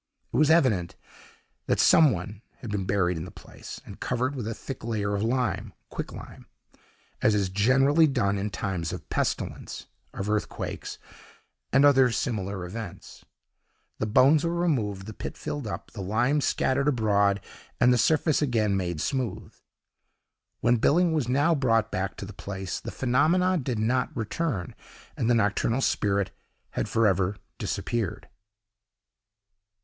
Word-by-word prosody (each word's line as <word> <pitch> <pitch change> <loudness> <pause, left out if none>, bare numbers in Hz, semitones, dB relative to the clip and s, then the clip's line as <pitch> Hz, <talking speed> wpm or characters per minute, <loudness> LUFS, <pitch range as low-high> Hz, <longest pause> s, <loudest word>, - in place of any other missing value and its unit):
It - - +1
was 150 +1 +4
evident 120 - +3 0.7
that - - +1
some 155 -2 +6
one 100 +2 -5 0.2
had 115 - -6
been 100 -2 -2
buried 90 -3 +1
in 80 - -5
the - - -9
place, - - -11
and - - -11
covered 125 +2 -1
with 125 -6 -4
a 115 - -2
thick 135 -4 -8
layer 105 -3 -1
of 100 - -1
lime 120 +2 -1 0.2
(quicklime), - - -8 0.7
as 110 - +4
is 100 -2 +1
generally 135 - +4
done 115 -8 +1
in 100 +1 -2
times 90 -5 -3
of - - -7
pestilence, - - -3 0.3
of 95 - -5
earthquakes, 105 0 -3 0.7
and 135 +2 +5
other 135 -3 +6
similar 100 -6 -2
events. 100 +1 -8 0.8
The 110 - -1
bones 140 +8 +5
were 170 0 0
removed, 110 - 0
the 110 - -7
pit - - -7
filled 145 -6 -4
up, 105 - -6
the 105 - -7
lime 120 +10 +1
scattered 135 +1 +1
abroad, 100 -6 +2 0.4
and 125 +1 +5
the - - +3
surface 155 +4 +2
again 110 -8 +1
made 85 -5 -2
smooth. 130 -4 -3 1.1
When 120 - +3
Billing 170 +8 +3
was 145 -7 0
now 145 +6 +3
brought 115 -6 +2
back 95 +1 -2
to - - -6
the 105 - -9
place, 95 -2 -5
the - - -7
phenomena 160 +9 +2
did 125 -4 -2
not 120 +4 0
return, 110 - -2 0.4
and 115 - 0
the 120 - +4
nocturnal 110 +3 +1
spirit 100 -5 +1 0.4
had - - -2
for 115 0 +2
ever 95 0 +2 0.2
disappeared. 115 -7 -3
115 Hz, 150 wpm, -27 LUFS, 100-135 Hz, 1.1 s, some